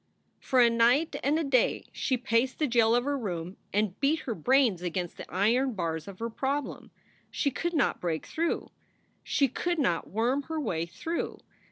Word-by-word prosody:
For 260 - +1
a 240 - +7
night 240 +8 +3
and 290 +3 +2
a 325 - 0
day 265 -4 +2
she 260 - -1
paced 245 +1 +1
the 310 - +1
jail 235 -3 +3
of 245 - +2
her 285 +2 0
room 180 -7 -4
and 205 -2 0
beat 300 +3 +2
her 235 - -3
brains 235 - +2
against 175 0 -3
the - - -10
iron 235 +8 +2
bars 160 -4 -3
of 195 -2 -9
her 230 +2 -3
problem. 275 +4 -3 0.4
She 280 - 0
could 345 +5 -2
not 280 - +1
break 165 -3 -2
through. 335 +1 -2 0.5
She 280 - +2
could 345 +7 -2
not 180 - 0
worm 240 +7 +1
her 320 -1 -2
way 170 - -2
through. 320 - -4
245 Hz, 185 wpm, -28 LUFS, 190-280 Hz, 0.5 s, a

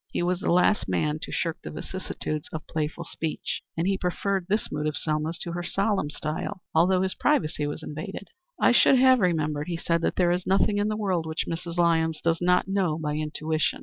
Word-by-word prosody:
He - - -1
was 180 0 0
the - - 0
last 180 - +3
man 150 - 0
to - - -6
shirk 165 -1 -2
the - - -7
vicissitudes 155 -5 -5
of 155 - -6
playful 160 +1 -3
speech, 160 -1 -4 0.2
and 165 - +1
he 195 0 +1
preferred 185 +1 -1
this 210 +2 0
mood 150 +1 -1
of 150 - -2
Selma's 155 +1 -1
to 170 - -4
her 175 +1 -3
solemn 195 -2 0
style, 155 +6 -4
although 180 +3 +4
his 190 - -1
privacy 155 - +1
was 145 +2 -5
invaded. 195 +7 -6 0.3
"I - - +5
should 270 - +6
have 260 0 +6
remembered," 155 -5 0
he 170 -2 -2
said, 165 0 0
"that - - 0
there 175 -2 +3
is 180 +1 -1
nothing 200 +2 +3
in 205 - +1
the 215 0 -1
world 185 -6 0
which 160 0 -2
Mrs. 170 +1 -4
Lyons 160 -2 +2
does 165 0 0
not 180 +1 +3
know 190 -5 +1
by 150 -2 -2
intuition." 155 - -1
170 Hz, 215 wpm, -26 LUFS, 155-190 Hz, 0.3 s, should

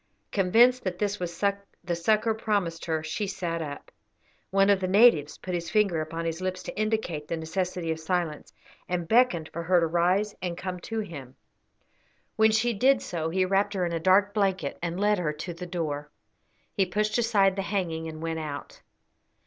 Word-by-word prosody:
Convinced 235 +6 +4
that 185 -2 -3
this 205 +1 -1
was 170 -2 -5 0.4
the 175 -1 -1
succour 215 +6 +2
promised 205 -7 -1
her, 160 -1 -1
she 195 +6 -3
sat 170 -3 -3
up. 145 -2 -7 0.6
One 195 +1 +4
of 200 - +3
the 185 - -1
natives 185 -7 +5
put 185 - -6
his 170 -2 -2
finger 195 -5 +2
upon 165 +2 -4
his 165 +1 -3
lips 185 0 -3
to - - -7
indicate 215 -8 -1
the 165 - -2
necessity 175 +1 -2
of 160 - -3
silence, 160 -2 -2 0.4
and 175 -2 -2
beckoned 220 -9 +3
for 170 - -3
her 175 +1 +3
to 165 - +2
rise 180 +5 +1
and 175 -2 -3
come 180 -1 -4
to 225 +5 -3
him. 140 -10 -9 1.0
When 220 0 +5
she 220 +2 +2
did 260 +5 +4
so 165 -2 -3
he 185 +2 +1
wrapped 200 +2 +1
her 185 -2 +1
in 170 - -3
a 165 - -1
dark 195 +4 +4
blanket 190 -8 0
and 175 +1 -3
led 210 -1 +2
her 155 -4 -1
to 165 +4 -6
the 180 +2 -7
door. 150 -4 -3 0.6
He 195 -3 +1
pushed 210 +5 0
aside 200 -5 +3
the 195 - -1
hanging 175 -5 -2
and 160 0 -7
went 165 0 -2
out. 145 -2 -7
180 Hz, 190 wpm, -27 LUFS, 165-205 Hz, 1.0 s, natives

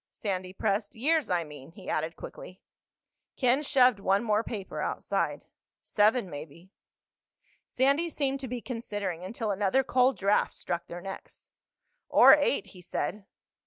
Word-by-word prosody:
Sandy 185 -3 -4
pressed. 200 +2 -1
"Years, 300 +3 +1
I 175 -2 +1
mean," 150 0 -12
he 190 0 -13
added 160 +2 -2
quickly. 185 - -10 0.8
Ken 255 +2 +3
shoved 255 -6 +4
one 195 +2 +2
more 215 -1 +1
paper 205 -4 -5
outside. - - -2 0.4
"Seven 215 +1 +2
maybe." 160 +3 -10 1.0
Sandy 280 +6 +2
seemed 275 -3 -1
to 265 - -6
be 245 0 -4
considering, 205 -8 -4
until 220 +3 -3
another 205 +7 +2
cold 255 0 +2
draft 200 +1 +1
struck 170 -1 -4
their 175 +1 -7
necks. 195 +1 -10 0.6
"Or - - +8
eight," - - +2
he 180 - -13
said. 190 +4 -4
205 Hz, 140 wpm, -29 LUFS, 185-255 Hz, 1.0 s, Or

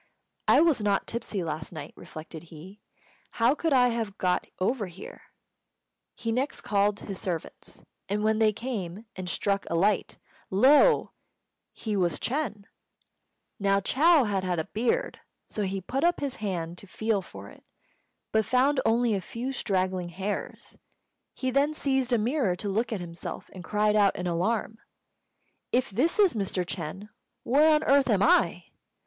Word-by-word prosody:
"I - - +6
was 320 -8 +3
not 205 -1 +1
tipsy 225 -5 -3
last 155 -1 -5
night," 160 - -8
reflected 160 +1 -10
he; 170 +6 -13 0.5
"how 235 +3 +3
could 325 +1 -1
I 250 -2 +5
have 225 -4 -3
got 180 -1 0
over 205 +2 0
here?" 180 +1 -11 0.9
He 230 -1 -3
next 260 +5 -1
called 205 0 +1
his 195 -2 -6
servants, 170 -4 -6 0.3
and 210 +1 -1
when 220 0 +2
they 220 -1 +4
came 210 -4 -5
and 185 -1 -5
struck 200 +1 0
a 170 - -1
light, 195 +4 +1 0.3
lo! 280 - +5 0.6
he 215 -2 -4
was 180 -3 +1
Ch'êng. 255 -6 -2 1.0
Now 195 -1 +3
Chou 295 - +4
had 200 -4 -1
had 180 -1 -1
a 160 - -1
beard, 250 - -1 0.3
so 215 - -4
he 195 -1 -1
put 265 - -2
up 345 +1 +3
his 280 -2 -3
hand 175 -5 -4
to 200 - -10
feel 215 +1 -1
for 100 - -11
it, - - -17 0.7
but 220 0 +3
found 260 +5 +2
only 230 0 +2
a 195 - -1
few 240 +7 -5
straggling 185 -7 -1
hairs. 190 +4 -5 0.6
He 260 -1 -2
then 285 +3 +2
seized 265 -3 0
a 240 - +4
mirror 230 - +1
to 200 +3 -4
look 225 +4 -1
at 210 -5 -2
himself, 170 -1 -7
and 185 - -9
cried 210 +1 +1
out 205 -2 +4
in 180 - -4
alarm: 210 +6 -1 0.9
"If 255 -1 +1
this 265 - +1
is 400 -5 +5
Mr. 195 -4 -1
Ch'êng, 180 +4 -6 0.3
where 295 +6 +4
on 300 - +1
earth 275 -1 +4
am 205 -3 +3
I?" 175 -3 +3
210 Hz, 165 wpm, -27 LUFS, 185-250 Hz, 1.0 s, I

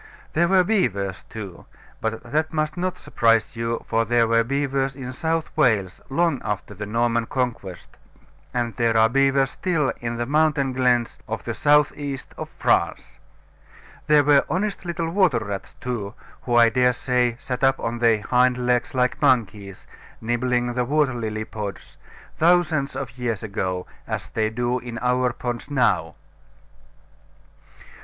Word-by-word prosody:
There 170 +2 +3
were 185 0 +4
beavers 100 - -1
too: 100 -5 -9 0.3
but 110 0 -3
that 155 +7 -1
must 155 -1 -1
not 185 0 -2
surprise 115 -1 +1
you, 115 0 -3
for 115 0 +2
there 115 0 +2
were 115 0 +3
beavers 135 +1 -1
in 130 -2 -6
South 160 +3 -2
Wales 110 - +1
long 160 0 +1
after 105 0 -4
the 105 +1 -6
Norman 115 +1 0
Conquest, 120 -8 -3 0.6
and 120 -2 -2
there 115 -1 +2
are 110 0 +6
beavers 135 +1 +2
still 165 -7 0
in 120 0 -4
the 120 - -1
mountain 145 -1 +2
glens 125 -2 +1
of - - -4
the - - -3
south 150 -1 +3
east 140 -3 -6
of - - -6
France. - - 0 0.9
There 150 -1 +5
were 145 -1 +5
honest 195 +5 -2
little 170 -1 -2
water 175 - +3
rats 100 -3 -5
too, 115 -5 -4 0.3
who 120 - -1
I 120 -1 +7
dare 125 +2 +3
say 125 -1 0
sat 125 0 -5
up 135 0 +3
on 115 +1 -3
their 115 -3 +3
hind 125 +1 +3
legs 125 0 0
like 125 0 +1
monkeys, 105 -6 0 0.3
nibbling 120 +1 0
the 125 0 0
water 145 +1 +1
lily 110 -2 -3
pods, 105 -3 -7 0.4
thousands 160 -4 +2
of 125 -2 -6
years 115 -3 -2
ago, 95 -3 -3 0.2
as - - -4
they 110 -1 0
do 120 +2 -1
in 120 -1 -7
our 125 +1 +1
ponds 120 +2 -5
now. 120 - +1
125 Hz, 155 wpm, -23 LUFS, 115-140 Hz, 0.9 s, I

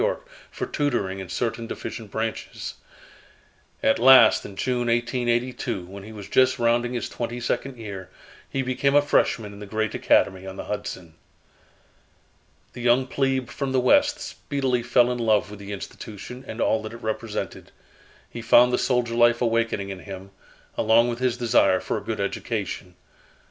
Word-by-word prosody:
Y., - - +2 0.3
for - - -4
tutoring 120 - -1
in 95 -2 -7
certain 115 +3 -2
deficient 110 -2 -6
branches. 110 +2 -4 1.1
At 110 - +3
last 125 -2 +7
in 100 - -9
June, 125 +2 -1
1882, 120 -3 -1
when 100 +2 -10
he 105 +3 -10
was 105 -3 -9
just 130 0 +3
rounding 120 +1 +1
his 120 -3 -2
twenty 120 0 -4
second 125 +2 -2
year, 100 -5 -7 0.4
he 135 - -1
became 135 +2 +1
a 145 - +7
freshman 110 -7 +1
in 100 - -11
the 105 - -8
great 110 +1 -1
Academy 95 0 +2
on 95 - -7
the - - -6
Hudson. 95 -5 -5 1.6
The 125 - -8
young 125 +2 +3
plebe 135 -1 -1
from 135 -2 -3
the 130 - +3
West 290 - +4
speedily 135 -4 -2
fell 120 +1 +3
in 125 - -3
love 110 -4 +2
with 105 - -9
the 100 0 -8
institution 105 +5 -8
and 110 - -7
all 110 - +2
that 110 +1 -7
it 115 - -11
represented. 110 0 -4 0.6
He 120 - -8
found 120 +2 +5
the - - +2
soldier 125 -2 +1
life 120 0 +4
awakening 115 -4 0
in 95 -1 -6
him, 95 0 -9 0.5
along 115 +2 +4
with 120 0 -3
his 125 -2 0
desire 115 -6 +3
for - - -2
a - - -12
good - - -4
education. 90 -1 -3
120 Hz, 170 wpm, -24 LUFS, 105-125 Hz, 1.6 s, last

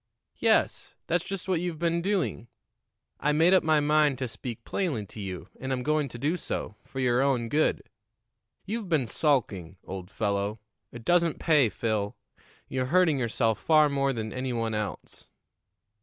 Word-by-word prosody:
"Yes; - - +1
that's 175 0 0
just 195 -1 -5
what 180 -3 +1
you've 175 -3 -3
been 170 +1 0
doing. 180 - -1 0.7
I 150 - +1
made 165 +5 +5
up 190 - +6
my 155 -1 +4
mind 150 -2 +3
to 130 - -2
speak 115 0 -7
plainly 150 - -2
to 105 - -11
you, 95 -4 -5
and 130 - -4
I'm 125 -1 -1
going 150 0 +1
to 120 - -8
do 150 +8 0
so 105 - -4
for 135 - -8
your 125 -1 +3
own 130 -4 +1
good. 155 +4 +1 0.8
You've 215 -1 -4
been 155 -7 +2
sulking, 110 - 0
old 95 -1 -7
fellow. 100 0 -1 0.3
It 120 -1 -10
doesn't 170 -2 +3
pay, 150 -8 +4
Phil; 105 0 -2 0.5
you're 130 -1 -2
hurting 165 -2 +3
yourself 115 -2 +1
far 155 -2 +5
more 140 -1 +1
than 110 -4 -4
any 130 0 -2
one 115 -1 -1
else." 105 -1 -5
135 Hz, 170 wpm, -28 LUFS, 115-160 Hz, 0.8 s, up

